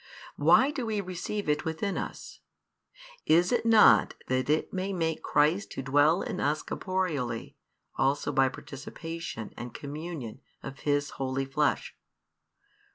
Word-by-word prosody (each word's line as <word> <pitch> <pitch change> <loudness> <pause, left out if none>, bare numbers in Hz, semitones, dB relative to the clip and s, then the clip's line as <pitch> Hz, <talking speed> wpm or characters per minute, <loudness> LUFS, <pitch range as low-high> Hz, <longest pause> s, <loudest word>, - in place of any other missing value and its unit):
Why 215 - +5
do 275 -4 -4
we 215 -2 -1
receive 190 +2 -4
it 150 0 +1
within 165 +4 -2
us? - - -6 0.9
Is 170 +3 +4
it 240 -1 +1
not 225 -1 +6
that 130 +2 0
it 155 +1 +1
may 190 +1 -2
make 160 -3 -1
Christ 155 +7 +2
to 135 - -5
dwell 145 +6 +3
in 185 - -4
us 150 +2 0
corporeally 155 -12 -3 0.4
also 140 +2 +1
by 135 0 +3
participation 165 -1 -7
and 120 0 -8
communion 145 -4 -6 0.2
of 135 -1 -8
His 145 -1 0
Holy 135 0 -1
Flesh? 140 +2 0
155 Hz, 135 wpm, -28 LUFS, 135-185 Hz, 0.9 s, not